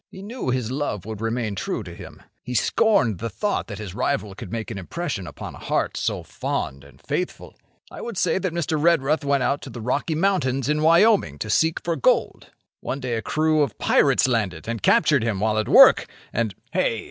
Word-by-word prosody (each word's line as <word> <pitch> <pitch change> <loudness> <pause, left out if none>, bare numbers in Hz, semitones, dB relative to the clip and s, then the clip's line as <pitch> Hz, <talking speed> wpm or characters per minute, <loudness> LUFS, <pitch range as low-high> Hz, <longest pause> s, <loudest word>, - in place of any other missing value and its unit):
He 190 - -11
knew 230 - -5
his 125 -2 -1
love 130 -9 -3
would 110 -1 -6
remain 115 -1 -2
true 100 +3 -3
to 90 -3 -9
him. - - -12 0.2
He 125 - -6
scorned 125 - +2
the 115 - -3
thought 205 - -2
that 100 - -7
his 100 -4 -7
rival 105 -3 -1
could 100 -2 -9
make 110 -3 -4
an 100 - -5
impression 115 - -4
upon - - -8
a - - -12
heart - - -1
so - - -2
fond 70 0 -4
and 70 -1 -18
faithful. - - -4 0.4
I - - -8
would 235 -5 -6
say 180 0 +1
that 185 -2 -2
Mr. 160 -2 -1
Redruth 160 -2 +3
went 140 -2 +1
out 140 +3 0
to - - -8
the 120 - -8
Rocky 135 +7 -1
Mountains 155 -8 +1
in 150 +1 +1
Wyoming 170 - +4
to 110 +7 -4
seek 160 +5 +1
for 170 -1 -1
gold. 140 - +1 0.3
One 135 - -4
day 125 -2 -3
a 115 - -1
crew 155 +7 +1
of 140 -8 -1
pirates - - +3
landed 105 -10 -1
and 115 -1 -3
captured 150 -5 +4
him 110 -4 -1
while 110 +1 +1
at 110 - -2
work, - - +7 0.3
and—" 110 -4 -1 0.2
"Hey! - - 0
125 Hz, 210 wpm, -23 LUFS, 110-160 Hz, 0.4 s, work